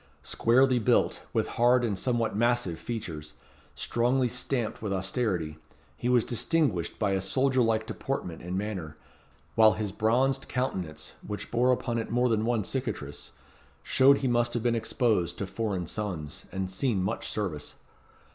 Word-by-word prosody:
Squarely 125 +2 +3
built, 110 - +2
with - - 0
hard 120 0 +5
and 105 -4 0
somewhat 115 +1 0
massive 120 -6 +1
features, 80 -11 -6 0.4
strongly 125 +2 +1
stamped 125 -1 -2
with 105 -2 -3
austerity, 95 -5 -1 0.4
he 120 - -2
was 125 -2 +4
distinguished 125 - 0
by 100 -3 +1
a 95 -1 +1
soldier 130 +5 +2
like 110 -1 +2
deportment 90 -10 -4
and 90 +2 -3
manner, 95 -7 -4 0.6
while 110 -1 +6
his 105 -2 -3
bronzed 130 +6 +1
countenance, 95 -11 -3
which 105 -1 -6
bore 125 +2 +3
upon 120 -2 0
it 115 - -4
more 125 +1 +2
than 110 -1 +1
one 115 -2 +1
cicatrice, 100 - -4 0.5
showed 135 +1 +5
he 135 - -1
must 120 0 +1
have 120 - -1
been 120 -1 +2
exposed 110 -5 0
to 100 - -2
foreign 95 -3 -2
suns, 85 -5 -5
and 95 -1 -3
seen 100 -1 0
much 100 +5 -2
service. 90 -9 -4
115 Hz, 155 wpm, -28 LUFS, 95-125 Hz, 0.6 s, while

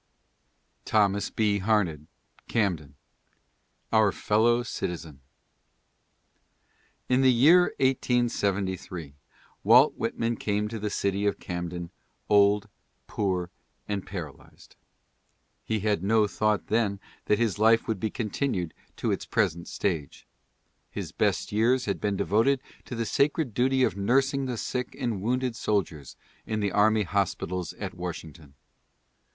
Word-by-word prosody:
THOMAS 100 -2 +2
B. 105 -2 +1
HARNED: 95 -7 0 0.4
Camden. 85 - -1 1.0
OUR 110 -2 +5
FELLOW 115 +5 +2
CITIZEN. 80 - -5 1.9
In 130 +1 +3
the 130 -1 +6
year 160 +9 +5
1873 100 - 0 0.5
Walt 125 +8 +6
Whitman 115 0 -2
came 105 0 -1
to 115 0 -5
the 105 0 -2
city 100 0 -1
of 100 - 0
Camden 85 -1 -5 0.4
"old, 100 0 +4 0.4
poor 90 -3 -2 0.4
and 100 -2 -2
paralyzed." 85 -8 -10 0.9
He 110 -2 -2
had 105 -4 0
no 110 +2 +3
thought 105 +1 0
then 105 -3 0 0.3
that 105 - +2
his 110 -3 0
life 115 +1 +4
would 110 -4 -1
be 110 - -1
continued 105 - -2 0.2
to - - -1
its - - -3
present 85 +2 0
stage. 80 -8 -3 0.6
His - - -6
best - - 0
years 120 +5 +2
had 100 - -2
been 100 -2 0
devoted 115 +9 +2 0.3
to 125 - -6
the 115 0 -2
sacred 140 +1 +1
duty 130 +3 +2
of - - +1
nursing 135 +7 +1
the 125 -2 -3
sick 125 +3 -3
and 110 -6 -2
wounded 125 +2 -1
soldiers 90 - -2 0.3
in 110 - -1
the 100 -2 0
army 110 +1 +3
hospitals 90 -2 -2
at - - -6
Washington. 85 -4 -8
105 Hz, 125 wpm, -27 LUFS, 95-115 Hz, 1.9 s, the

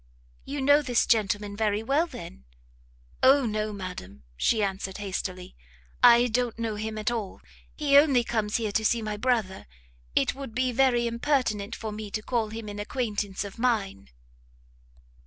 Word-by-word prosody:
"You 280 0 -4
know 285 +2 +5
this 250 -5 +1
gentleman 205 -2 +1
very 210 0 0
well, 285 +8 +1
then?" 65 - -10 0.8
"O 270 0 +5
no, 215 -1 -2
madam!" 180 - -8
she 215 - +1
answered 195 -1 -3
hastily, 185 - -5 0.5
"I 240 0 +7
don't 245 -1 -1
know 230 -1 -2
him 215 +1 -4
at 215 +2 -1
all! 220 -5 -4 0.4
he 290 -2 +1
only 275 -5 +3
comes 220 -3 -1
here 220 -3 -2
to 220 - 0
see 230 +1 +1
my 215 -1 -3
brother; 215 -4 -1 0.5
it 135 - +2
would 270 -4 -8
be 255 0 +1
very 245 -1 +3
impertinent 235 -4 -1
for 220 -1 -5
me 210 0 -6
to 215 +1 -4
call 230 -3 -1
him 225 0 -7
an 205 0 -6
acquaintance 205 -3 -3
of 200 +2 -9
mine." 210 - -1
220 Hz, 160 wpm, -27 LUFS, 205-245 Hz, 0.8 s, I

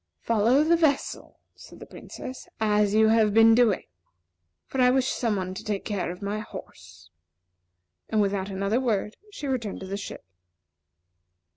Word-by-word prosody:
"Follow 230 +5 +3
the 330 +2 +4
vessel," 310 -4 -1 0.2
said - - -15
the - - -10
Princess, 255 0 -10
"as 210 -1 +2
you 220 0 +5
have 220 -2 +3
been 225 0 +7
doing; 225 -4 +3 0.8
for 265 - -2
I 250 - +6
wish 260 0 +2
some 230 -4 -1
one 185 -1 -3
to 195 +3 -8
take 210 -2 -3
care 195 -4 -2
of 180 +3 -10
my 205 +1 -2
horse." 85 - -11 1.0
And 220 - +1
without 200 -1 0
another 195 +4 0
word, 215 -4 -1
she 350 -8 -8
returned 250 -7 -3
to - - -6
the 195 +1 -4
ship. 200 - -8
215 Hz, 160 wpm, -26 LUFS, 200-245 Hz, 1.0 s, been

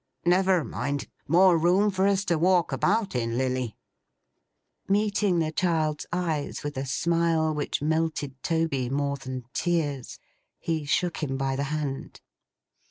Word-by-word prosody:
Never 185 -1 +3
mind. 145 0 -3 0.2
More 175 +2 +5
room 185 +5 +3
for 190 0 +2
us 200 0 +1
to 170 -3 +1
walk 180 0 +3
about 205 0 +1
in, 115 -1 -1
Lilly!' 130 -3 -1 1.1
Meeting 205 -2 +2
the 160 -2 0
child's 160 -4 0
eyes 165 -5 -2
with 145 0 -4
a 135 +1 -3
smile 165 +1 +1
which 150 -1 -2
melted 155 -4 -1
Toby 160 -7 0
more 140 +1 -1
than 130 -2 -6
tears, 150 -6 -1 0.4
he 160 -3 -2
shook 160 +4 0
him 135 -3 -2
by 135 0 -1
the 140 +1 -1
hand. 150 -3 -4
160 Hz, 140 wpm, -26 LUFS, 140-175 Hz, 1.1 s, More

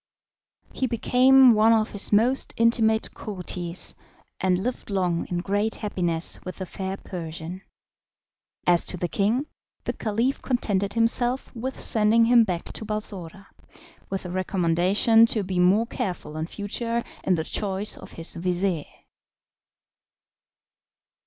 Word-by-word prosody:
He 260 - -1
became 255 +2 +5
one 220 +1 +4
of 220 -1 +1
his 205 - -2
most 235 +6 +2
intimate 225 -1 +2
courtiers, 180 -3 -5 0.5
and 185 0 +1
lived 250 -1 -4
long 180 -4 0
in 175 - -3
great 205 +4 -1
happiness 175 -6 -2
with 185 - -6
the 190 - -5
fair 190 +2 -5
Persian. 170 0 -7 1.0
As 175 -1 +4
to 180 - -3
the 175 - -2
king, 225 - 0 0.4
the - - -2
Caliph 230 +5 -1
contented 200 -6 -1
himself 240 +2 +2
with 260 +3 -5
sending 225 0 +4
him 235 0 +6
back 180 -4 -4
to - - -6
Balsora, 200 -4 -4 0.6
with 195 - -3
the 180 - -6
recommendation 185 +5 +3
to 220 -2 0
be 185 -1 -2
more 190 +6 +4
careful 185 - -5
in 155 +1 -3
future 230 +5 -3 0.2
in 185 - +2
the 160 - -2
choice 200 +3 -2
of - - -12
his 165 +1 -3
vizir. 180 -2 -1
200 Hz, 135 wpm, -25 LUFS, 180-230 Hz, 1.0 s, him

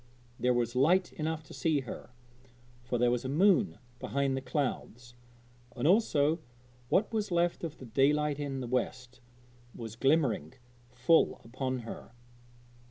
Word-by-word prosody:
There 125 +2 +2
was 120 0 -1
light 175 +8 +3
enough 160 0 -3
to 145 - -13
see 155 -4 +1
her, 125 - -8 0.7
for 120 0 -2
there 120 0 +3
was 120 -1 -1
a 130 - -3
moon 195 - +3 0.2
behind 140 0 -1
the 135 - -3
clouds, 125 -3 -3 0.6
and 130 +3 0
also 165 -6 +3 0.5
what 215 +4 +2
was 215 -2 -1
left 175 -1 +1
of 160 -2 -5
the 130 - -10
daylight 145 +4 +2
in 140 -2 -3
the 125 - -4
west 125 0 -3 0.5
was 115 -2 -7
glimmering 135 - +1 0.4
full 130 +7 +3
upon 130 +1 -3
her. 115 +1 -9
135 Hz, 145 wpm, -31 LUFS, 125-160 Hz, 0.7 s, light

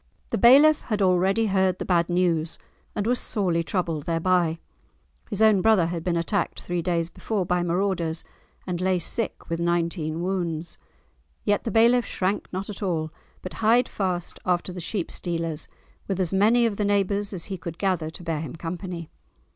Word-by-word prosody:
The - - -1
bailiff 285 +6 +7
had 215 -3 -1
already 190 +3 +3
heard 190 -3 +2
the - - -4
bad 170 -2 +2
news, 170 -3 +1 0.4
and 205 - -1
was 245 +2 +1
sorely 180 -6 0
troubled 165 -4 -2
thereby. 170 0 +2 0.7
His 210 +2 +1
own 215 -3 +5
brother 220 -5 +4
had 170 -1 -3
been 175 -1 0
attacked 170 +3 -1
three 175 -1 -3
days 170 -1 0
before 205 -5 -2
by 180 0 +1
marauders, 175 -2 -1 0.4
and 180 -1 -3
lay 185 0 +2
sick 220 +6 -3
with 165 0 -2
nineteen 170 -1 -1
wounds. 175 -3 -3 0.6
Yet 205 -1 +1
the - - 0
bailiff 235 +3 +4
shrank 190 +2 -2
not 190 +2 -4
at 210 - -7
all, 160 -5 -1 0.3
but 185 - -6
hied 235 +3 +4
fast 180 -3 -3
after 180 0 0
the 180 - -6
sheep 175 +1 -3
stealers, 165 -3 -3 0.4
with 195 -2 -2
as 185 -1 0
many 225 +5 +4
of 215 -3 -1
the 210 - 0
neighbours 200 0 +1
as 180 -4 -4
he 195 -2 -5
could 165 0 -7
gather 180 -5 0
to 165 - -9
bear 165 -2 -2
him 160 - -6
company. 170 0 -6
180 Hz, 180 wpm, -25 LUFS, 170-200 Hz, 0.7 s, bailiff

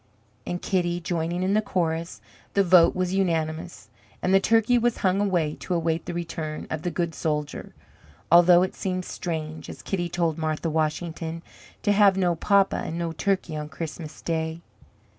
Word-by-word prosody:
and 175 0 -3
Kitty, 175 -2 0
joining 175 +1 -2
in 190 +1 +1
the 215 - +3
chorus, 170 -4 -2 0.3
the 200 - +5
vote 180 -2 +6
was 185 0 -1
unanimous, 165 -2 -1 0.3
and 185 - 0
the 195 - +7
turkey 225 +4 +3
was 240 0 +1
hung 190 +2 +3
away 175 -7 +1
to 180 - -2
await 165 -1 -1
the 175 - -3
return 160 -3 -4
of 160 - -2
the 175 - -1
good 170 0 -2
soldier, 150 -2 -3 0.6
although 175 +1 +7
it 185 - -2
seemed 185 -1 -3
strange, 160 -3 -5
as - - -9
Kitty 175 -3 -2
told 170 -2 -1
Martha 155 +1 -1
Washington, 160 +1 -2 0.4
"to 205 - +3
have 200 -2 +5
no 180 -2 +2
papa 195 +3 +2
and 165 - -4
no 170 -1 -2
turkey 170 +1 -1
on 150 0 -5
Christmas 155 -1 -7
Day." 160 0 -2
170 Hz, 170 wpm, -25 LUFS, 160-185 Hz, 0.6 s, the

